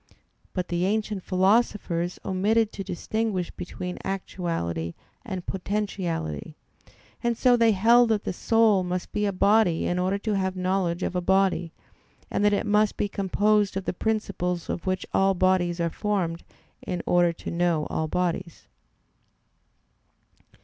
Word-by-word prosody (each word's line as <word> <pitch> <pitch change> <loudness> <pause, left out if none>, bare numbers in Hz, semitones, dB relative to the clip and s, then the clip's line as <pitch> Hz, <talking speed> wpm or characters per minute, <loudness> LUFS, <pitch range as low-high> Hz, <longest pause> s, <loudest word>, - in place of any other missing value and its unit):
But 180 -2 -3
the 175 0 0
ancient 210 -1 -1
philosophers 185 -3 +1
omitted 215 +4 +2
to 195 - -6
distinguish 190 0 -2
between 180 0 -6
actuality 165 - -3 0.3
and 190 -7 -5
potentiality; 185 - -3 0.7
and 235 -1 +1
so 250 -1 +5
they 230 -2 +4
held 230 +4 +5
that 215 -2 +1
the - - -3
soul 220 -1 +3
must 180 0 -3
be 210 0 0
a - - +1
body 200 -2 +3
in 180 - 0
order 185 +2 +1
to 210 +1 -2
have 190 -1 -1
knowledge 185 -1 0
of - - -2
a 180 - +1
body; 190 -2 +2 0.6
and - - 0
that 205 - +5
it 205 - 0
must 210 0 +2
be 205 - 0
composed 205 +1 +1
of 195 - -4
the - - -1
principles 180 -4 -2
of 175 - -5
which 185 0 -1
all 195 0 +3
bodies 180 -1 +2
are 170 -1 0
formed 180 -5 -1 0.4
in 175 -1 -4
order 175 -1 +3
to - - -7
know 170 -3 +1
all 160 - -1
bodies. 175 -1 -2
190 Hz, 150 wpm, -26 LUFS, 175-210 Hz, 0.7 s, so